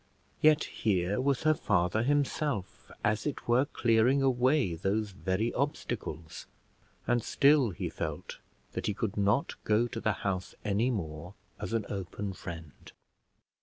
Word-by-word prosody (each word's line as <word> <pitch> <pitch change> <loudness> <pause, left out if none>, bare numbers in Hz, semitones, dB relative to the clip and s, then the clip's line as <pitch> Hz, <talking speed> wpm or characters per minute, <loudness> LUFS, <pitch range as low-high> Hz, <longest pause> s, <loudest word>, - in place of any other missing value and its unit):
Yet 155 0 +5
here 100 +1 0
was 140 +1 +1
her 155 0 +5
father 100 - +1
himself, 140 -5 -1
as 105 +6 +1
it 145 - -4
were, 120 +3 +4
clearing 120 +2 +3
away 130 - +3
those 100 +5 -1
very 95 +4 -1
obstacles, 85 - -3 0.6
and 120 0 +2
still 140 -3 +4
he 90 - -4
felt - - -5 0.3
that - - -3
he 105 - 0
could 110 -1 -2
not 105 +6 +1
go 110 +2 +3
to 115 -1 -5
the 110 - +2
house 95 -2 -2
any 105 +4 +2
more 85 -4 -4 0.2
as - - -4
an 115 -3 0
open 100 +1 -4
friend. 80 -5 -9
110 Hz, 140 wpm, -30 LUFS, 95-130 Hz, 0.6 s, Yet